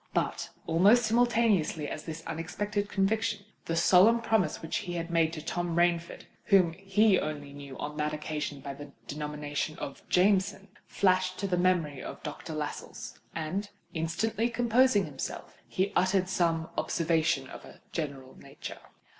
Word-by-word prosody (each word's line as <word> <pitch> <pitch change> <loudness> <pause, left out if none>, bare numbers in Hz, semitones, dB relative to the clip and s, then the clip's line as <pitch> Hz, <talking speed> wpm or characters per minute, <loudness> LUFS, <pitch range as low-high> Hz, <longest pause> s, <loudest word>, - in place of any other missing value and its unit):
But, - - -1 0.2
almost 205 +9 +5
simultaneously 220 -9 +2
with 150 - -6
this 160 0 -6
unexpected 205 +5 -3
conviction, 205 +1 0 0.2
the 165 - -1
solemn 190 +7 +6
promise 220 -8 +1
which 160 - -1
he 180 -4 -4
had 170 0 -3
made 165 -1 +3
to 155 -2 -6
Tom 175 0 -2
Rainford 170 0 +1 0.2
(whom 185 -5 +5
he 195 +2 +3
only 145 -2 -5
knew 140 -2 -9
on 150 +1 -5
that 150 0 0
occasion 150 -2 -4
by 140 0 -5
the 145 0 -10
denomination 150 +1 -3
of 140 - -6
Jameson) 195 +1 +2 0.2
flashed 185 -1 +2
to 200 - -2
the 185 - +1
mind 175 -6 +1
of - - -8
Doctor 155 +1 -6
Lascelles; 150 -1 -6 0.2
and, 180 +6 -3 0.2
instantly 210 +8 0
composing 235 -2 +3
himself, 140 -3 -6
he 195 +2 -1
uttered 185 0 +3
some 165 -3 +1
observation 160 -4 +1
of - - -10
a - - -14
general 140 -5 -5
nature. - - -9
175 Hz, 150 wpm, -29 LUFS, 155-200 Hz, 0.2 s, solemn